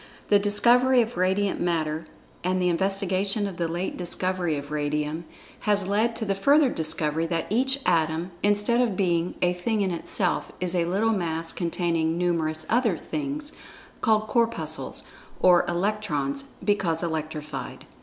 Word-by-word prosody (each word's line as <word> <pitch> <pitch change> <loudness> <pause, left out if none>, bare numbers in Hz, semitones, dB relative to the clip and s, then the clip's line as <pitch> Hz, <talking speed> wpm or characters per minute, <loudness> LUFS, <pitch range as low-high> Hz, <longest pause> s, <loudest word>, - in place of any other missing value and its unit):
The 205 - +6
discovery 240 +5 +4
of 230 +1 -3
Radiant 190 +2 +1
Matter, 160 -2 -1 0.4
and 185 +1 +1
the 180 -1 +2
investigation 195 +3 +1
of 195 -4 -5
the 170 - 0
late 175 +3 -3
discovery 180 -2 -1
of 145 +1 -7
Radium, 150 +2 -2 0.3
has 205 -2 +1
led 220 +4 +1
to 220 - -4
the 200 - +1
further 280 +8 +4
discovery 160 -2 -1
that 165 -1 -1
each 265 +4 +2
Atom, 165 +1 +1
instead 205 +4 +2
of 225 -7 0
being 175 -2 +1
a 180 0 +3
"thing 210 +5 -1
in 190 -2 +1
itself" 175 +2 -1
is 180 -1 -1
a 175 -2 +1
little 200 +6 +1
mass 165 -4 -2
containing 170 -2 -1
numerous 160 -3 0
other 225 -6 +2
"Things" 295 - -4 0.5
called 215 -2 +3
"Corpuscles" 230 +1 0 0.4
(or 180 -1 +5
"Electrons," 175 -7 -1 0.2
because 180 -5 +1
electrified). 155 -2 -4
180 Hz, 145 wpm, -25 LUFS, 165-210 Hz, 0.5 s, The